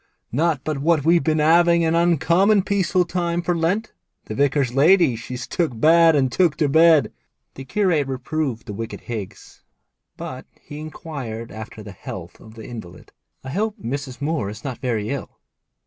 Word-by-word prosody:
'Not 150 +1 0
but 155 -3 -2
what 155 0 +2
we've 170 +1 +4
been 155 -1 +1
'aving 170 +2 +4
an 160 - +1
uncommon 175 +4 +3
peaceful 185 -3 +1
time 175 0 -2
for 175 0 0
Lent. 180 +7 -1 0.3
The - - -6
vicar's 140 0 +1
lady 155 0 +4
she's 125 +2 -6
took 130 -3 -2
bad 165 +3 +6
and 130 -3 +2
took 170 +1 +2
to 150 - +2
bed.' 160 +1 +5 0.4
The 135 - -9
curate 175 -5 +1
reproved 135 -1 -3
the 105 - -6
wicked 115 +2 -6
Higgs, 110 -5 -8 0.6
but - - -7
he 145 - -10
inquired 140 -7 -7
after 110 0 -9
the 100 - -9
health 90 -1 -9
of 110 0 -15
the 110 - -10
invalid. 100 -8 -10 0.3
'I 130 - -7
hope 210 - -1
Mrs. 135 -3 -5
Moore 145 -7 -1
is 105 +2 -9
not 130 -5 -5
very 115 -3 -2
ill?' 140 - -6
150 Hz, 170 wpm, -22 LUFS, 125-170 Hz, 0.6 s, bad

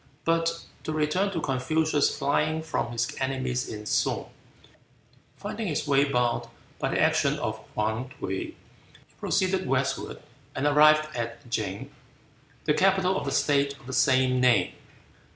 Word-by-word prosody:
But 165 0 +1 0.2
to - - -3
return 155 +6 +1
to 185 -4 -3
Confucius 150 +2 +1
flying 155 +3 +1
from 155 -6 -2
his 115 0 -2
enemies 130 -2 -1
in 105 -1 -7
Sung. - - 0 1.1
Finding 225 -1 -4
his 150 -2 -2
way 140 0 +4
barred 125 -4 0 0.3
by - - 0
the - - 0
action - - +3
of - - -3 0.2
Hwan 110 +4 -1
T'uy, 95 -6 -5 0.5
he - - -30
proceeded 190 -1 0
westward 135 0 -1 0.4
and 140 - -1
arrived 155 +1 +5
at 115 +2 -5
Ch'ing, 100 -4 -3 0.7
the 150 - +3
capital 190 +1 +3
of - - -2
the 140 - -2
state 140 0 +2
of - - -19
the 130 - -6
same 130 -1 +3
name. 120 -8 +3
140 Hz, 145 wpm, -27 LUFS, 125-155 Hz, 1.1 s, arrived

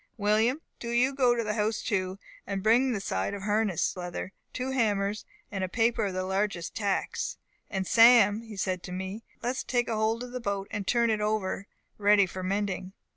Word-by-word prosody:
William, 220 +7 +2 0.2
do 235 - -5
you 245 +3 +2
go 250 -3 +3
to 235 - 0
the 210 -1 -1
house 215 0 0
too, 190 -3 -1 0.3
and 195 -1 -3
bring 245 +4 +4
the 220 - -1
side 195 - -2
of 200 - -7
harness 210 -4 +1
leather, 180 +1 -5 0.2
two 255 +1 -3
hammers, 210 -5 0 0.3
and 195 -2 -2
a 185 - -2
paper 225 +1 +2
of 195 - -2
the 185 - -1
largest 190 -2 -1
tacks. 200 -3 -1 0.3
And 190 -1 -2
Sam,' 225 -1 +6 0.2
said 185 -1 -1
he - - -12
to 180 - -7
me, 190 +4 -5 0.2
'let 240 - 0
us 260 - -4
take 245 -1 0
hold 220 +1 0
of 250 - -8
the 250 - -4
boat, 200 -3 -2
and 200 -2 -4
turn 235 -1 +3
it 215 -1 0
over 210 -2 -1 0.3
ready 205 -1 +5
for 185 +1 -7
mending. 190 0 -2
210 Hz, 200 wpm, -28 LUFS, 195-230 Hz, 0.3 s, Sam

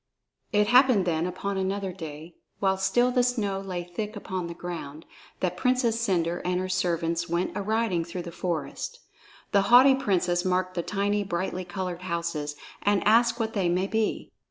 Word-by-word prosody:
It 210 -1 +3
happened 245 -5 +5
then 165 0 0
upon 195 +2 -3
another 190 0 -2
day, 160 -1 -8 0.2
while 190 -1 +2
still 195 +6 +2
the 250 0 +3
snow 220 -6 0
lay 185 -3 -4
thick 210 +5 -5
upon 185 -3 -4
the 170 - -7
ground, 165 -4 -7 0.4
that 180 -1 0
Princess 245 0 +1
Cendre 175 -5 0
and 180 0 0
her 185 - -2
servants 170 -2 0
went 170 +2 -1
a 205 - -1
riding 215 -4 0
through 175 +1 -6
this 170 - -8
forest. 175 - -4 0.5
The 200 - +4
haughty 255 +3 +8
princess 180 -8 +1
marked 185 0 0
the 175 - -1
tiny 205 +3 0
brightly 185 -1 -3
colored 180 -1 -4
houses, 170 -4 -3 0.3
and 205 -1 +2
asked 235 +2 +4
what 225 -1 -1
they 190 -4 +1
might 185 +3 0
be. 220 -1 -1
185 Hz, 175 wpm, -27 LUFS, 175-210 Hz, 0.5 s, haughty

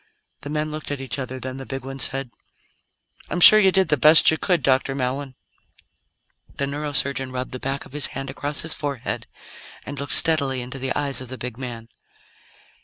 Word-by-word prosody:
The 145 - -7
men 155 +1 -2
looked 155 0 -6
at 145 -1 -4
each 130 -2 -5
other, 130 0 -5
then 130 0 -6
the 135 - -7
big 135 -1 -6
one 135 0 -7
said: 135 -1 +1 1.0
"I'm 180 - -2
sure 215 +4 +10
you 190 -2 +4
did 190 0 +2
the 150 - +3
best 155 +5 +7
you 160 - 0
could, 175 -7 +1
Dr. 135 +1 +1
Mallon." 130 +1 -3 1.2
The 140 - 0
neurosurgeon 140 -2 -1
rubbed 130 0 -5
the 130 - -6
back 135 +1 -4
of - - -16
his 150 -2 +1
hand 135 0 -6
across 145 +2 -3
his 160 - 0
forehead 140 -5 -4 0.6
and 145 - -5
looked 140 - +1
steadily 140 -6 +2
into 125 +2 -7
the 130 0 -3
eyes 140 -2 -2
of 130 - -9
the 130 - -6
big 125 -2 -6
man. 120 -3 -7
135 Hz, 195 wpm, -22 LUFS, 130-145 Hz, 1.2 s, sure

